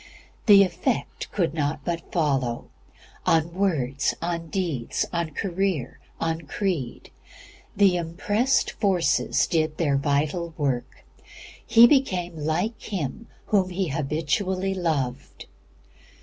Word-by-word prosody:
The 200 -2 +9
effect 185 +7 -2
could 170 -6 0
not 150 -2 -2
but 170 -1 -4
follow 135 -8 0 0.5
on 165 +1 +2
words, 150 -9 0
on 170 -1 -3
deeds, 160 -10 -2
on 170 -2 -1
career, 185 -8 -2 0.2
on 165 0 -1
creed. 160 - -3 0.6
The 195 -3 +4
"impressed 205 +9 0
forces" 190 -5 +1
did 155 -2 0
their 145 -5 +2
vital 150 +4 -1
work. 135 -5 -2 0.6
He 230 +1 +7
became 185 - +2
like 165 +9 -2
Him 195 - -4 0.2
Whom 195 -3 +2
he 185 -1 -2
habitually 160 +7 -1
loved. 145 -8 -3
170 Hz, 105 wpm, -25 LUFS, 150-190 Hz, 0.6 s, The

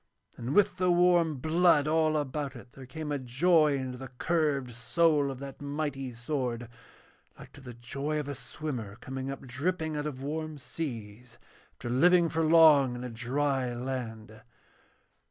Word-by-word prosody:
And 125 +5 -4
with 205 0 +4
the 185 0 +2
warm 175 -2 +4
blood 155 +1 +3
all 155 0 +2
about 145 -1 -3
it 120 0 -12
there 130 -1 -12
came 150 +3 -6
a 145 - -1
joy 150 +4 +3
into 130 -1 -5
the 135 - -7
curved 140 -1 -1
soul 145 +4 +2
of 135 - -5
that 135 +1 -9
mighty 145 -2 -3
sword, 120 -1 -3 0.7
like - - -13
to 145 - -13
the 125 -3 -10
joy 140 +6 -3
of 145 - -4
a 145 - -3
swimmer 120 -7 -6
coming 130 +3 -6
up 135 - -6
dripping 160 +5 -2
out 150 0 -2
of 135 -3 -6
warm 155 +1 -4
seas 125 -5 -7 0.4
after 120 - -8
living 170 +6 +5
for 165 +1 0
long 155 -5 +6
in 120 - -6
a 125 - -5
dry 130 +1 -1
land. 115 -4 -6
140 Hz, 165 wpm, -29 LUFS, 125-155 Hz, 0.7 s, long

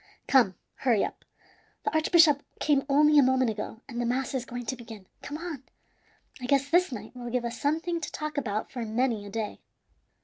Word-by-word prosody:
Come, 235 -9 +4 0.2
hurry 235 -6 +2
up, - - -8 0.6
the - - -1
archbishop 315 -2 +5 0.2
came 280 -2 +2
only 300 +1 +6
a - - +8
moment 260 -2 +3
ago, 220 +1 -6
and 240 -3 -4
the - - 0
mass 255 +3 -1
is 260 -2 -2
going 245 -1 -6
to 260 - -2
begin. 225 -5 -11 0.2
Come 295 - -6
on; 330 -5 -6 0.8
I 250 - -4
guess 275 +1 +2
this 355 -1 +4
night 250 - -7
will 240 -1 -6
give 245 0 -1
us 235 0 -5
something 330 +4 0
to - - -4
talk 305 -1 -4
about 220 -6 -2
for 245 -3 -4
many 225 -1 -1
a - - -8
day!" 215 0 -4
260 Hz, 200 wpm, -28 LUFS, 235-295 Hz, 0.8 s, a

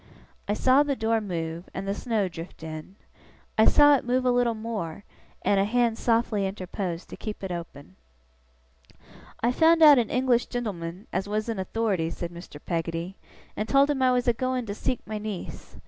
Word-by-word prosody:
I 205 - 0
saw 260 +5 +4
the 290 -1 0
door 225 -1 +1
move, 170 -3 -4
and 195 +1 -4
the 200 - 0
snow 215 -2 -1
drift 165 -1 -9
in. 155 +3 -8 0.6
I 220 - +5
saw 290 0 +7
it 270 - -1
move 250 +1 0
a 250 - +4
little 245 -2 +2
more, 210 -6 -5 0.4
and 200 - +3
a - - +4
hand 235 +2 +1
softly 225 -4 +1
interpose 185 -2 -4
to - - -10
keep 215 -2 -7
it 190 - -4
open. 145 - -8 1.5
'I 235 - +3
found 325 +4 +5
out 295 -4 +9
an 230 - 0
English 250 -1 +2
gen'leman 195 -6 -5
as 205 - -2
was 215 +2 -1
in 225 -4 -2
authority,' 190 -4 -1
said 170 +1 -5
Mr. 170 -3 -11
Peggotty, 165 +2 -3 0.4
'and 215 +1 -3
told 275 +4 +4
him 275 -2 -2
I 255 -1 +4
was 250 0 +1
a 240 - +5
going 255 +1 -2
to 200 - -4
seek 240 +3 -3
my 215 0 -4
niece. 210 -3 -7
215 Hz, 190 wpm, -26 LUFS, 180-245 Hz, 1.5 s, out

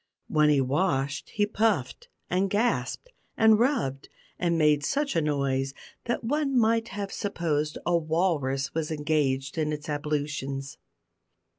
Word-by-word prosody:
When 150 -1 +3
he 145 -2 +4
washed 140 0 0
he 205 -2 +1
puffed, 210 - 0 0.2
and 190 +2 +1
gasped, 240 - -1 0.3
and 220 -1 +6
rubbed, 225 - 0 0.3
and 170 -2 +1
made 150 -2 +3
such 280 - 0
a 165 - +3
noise, 135 -2 0 0.3
that 240 - -2
one 275 +2 0
might 230 0 +3
have 200 -1 -5
supposed 155 -7 -1
a 175 - +2
walrus 155 -5 0
was 160 -1 -2
engaged 150 -3 0
in 155 -1 0
its 150 -1 -5
ablutions. 145 -2 -3
155 Hz, 135 wpm, -27 LUFS, 140-205 Hz, 0.3 s, and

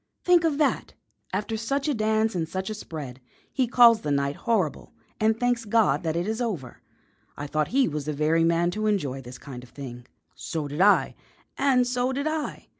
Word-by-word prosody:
Think 355 -2 +4
of 315 -4 +1
that! 300 -2 0 0.4
After 210 +4 -2
such 275 +6 -2
a 295 - +2
dance 220 -1 +1
and 165 -3 -2
such 190 +3 -4
a - - -2
spread, 145 -11 -8 0.3
he 260 -2 +1
calls 235 -2 +6
the 150 - -3
night 140 0 0
horrible 210 - -1 0.3
and 220 +1 +2
thanks 245 -1 +1
God 205 -10 +2
that 160 -1 -2
it 175 +3 -1
is 220 +2 -2
over. 185 - -4 0.6
I 145 - -5
thought 155 +1 -1
he 265 +1 +2
was 150 -2 -4
the 150 - -2
very 155 +3 +2
man 170 +1 +2
to 215 +3 -2
enjoy 145 -11 -1
this 125 0 -10
kind 125 -3 -9
of 125 - -14
thing." 125 -3 -9 0.3
"So 155 -3 -4
did 145 +4 -3
I." 205 +1 +4 0.4
"And 265 -3 +3
so 250 +1 0
did 280 +2 -2
I." 310 -1 -3
205 Hz, 200 wpm, -26 LUFS, 150-245 Hz, 0.6 s, calls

